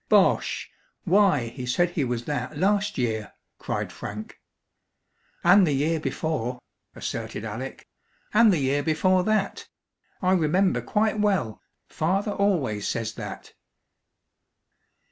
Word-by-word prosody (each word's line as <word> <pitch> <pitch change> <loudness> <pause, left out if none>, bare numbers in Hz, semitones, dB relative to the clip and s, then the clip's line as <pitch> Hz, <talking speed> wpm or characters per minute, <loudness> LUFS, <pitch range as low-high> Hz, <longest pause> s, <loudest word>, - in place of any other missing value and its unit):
"Bosh! - - +3 0.3
Why, 185 - +3
he 125 +1 -7
said 175 +8 +2
he 155 - -1
was 120 -2 -2
that 145 0 -3
last 205 +4 +1
year!" 110 -4 -2 0.3
cried - - -3
Frank. 105 +1 -7 1.0
"And 180 +1 +6
the 150 - +1
year 155 +4 +1
before," 150 -6 -2 0.4
asserted - - -5
Alec; - - -6 0.5
"and 220 0 +6
the 180 - +2
year 140 0 +1
before 180 +5 +2
that 215 -2 0 0.5
I 185 -1 +1
remember 180 +2 +2
quite 215 0 0
well. 190 - 0 0.3
Father 195 +6 0
always 160 - 0
says 115 -1 -2
that." - - -8
165 Hz, 120 wpm, -25 LUFS, 125-195 Hz, 1.0 s, And